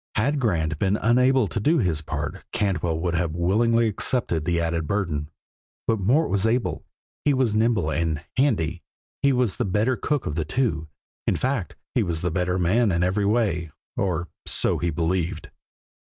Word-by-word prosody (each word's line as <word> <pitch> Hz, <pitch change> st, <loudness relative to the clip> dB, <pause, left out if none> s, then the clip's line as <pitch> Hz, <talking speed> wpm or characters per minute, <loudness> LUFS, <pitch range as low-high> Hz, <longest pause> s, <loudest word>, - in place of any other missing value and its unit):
Had 140 Hz, +7 st, +1 dB
Grant 80 Hz, -, 0 dB
been 100 Hz, +1 st, +2 dB
unable 125 Hz, +1 st, +3 dB
to 110 Hz, -, -3 dB
do 155 Hz, +11 st, +3 dB
his 90 Hz, -, +1 dB
part 75 Hz, +3 st, -4 dB
Cantwell 90 Hz, -5 st, 0 dB
would 85 Hz, -1 st, -1 dB
have 85 Hz, -1 st, -1 dB
willingly 115 Hz, +7 st, +2 dB
accepted 100 Hz, -, 0 dB
the 85 Hz, -1 st, +1 dB
added 85 Hz, -1 st, -1 dB
burden, 80 Hz, -7 st, -1 dB, 0.6 s
but 110 Hz, -2 st, +1 dB
Mort 130 Hz, -, +2 dB
was 100 Hz, +2 st, +2 dB
able, 110 Hz, -8 st, 0 dB, 0.4 s
he 145 Hz, -2 st, +3 dB
was 130 Hz, -5 st, +1 dB
nimble 110 Hz, -7 st, +2 dB
and 80 Hz, -2 st, -1 dB
"handy," 95 Hz, -, +1 dB, 0.4 s
he 140 Hz, -, +4 dB
was 125 Hz, -7 st, +1 dB
the -, -, 0 dB
better 105 Hz, +7 st, +1 dB
cook 145 Hz, +2 st, -1 dB
of -, -, -2 dB
the 80 Hz, +1 st, -1 dB
two; 80 Hz, -, -1 dB, 0.4 s
in -, -, +2 dB
fact, 130 Hz, -7 st, -2 dB, 0.2 s
he -, -, +2 dB
was 85 Hz, -2 st, -2 dB
the 90 Hz, -, -1 dB
better 90 Hz, +1 st, 0 dB
man 100 Hz, +5 st, +2 dB
in 85 Hz, 0 st, +1 dB
every 95 Hz, +3 st, +1 dB
way 100 Hz, -7 st, +1 dB, 0.3 s
or 85 Hz, -3 st, -1 dB, 0.2 s
so -, -, +2 dB
he 85 Hz, -, 0 dB
believed. 85 Hz, +2 st, -2 dB
95 Hz, 175 wpm, -24 LUFS, 85-115 Hz, 0.6 s, he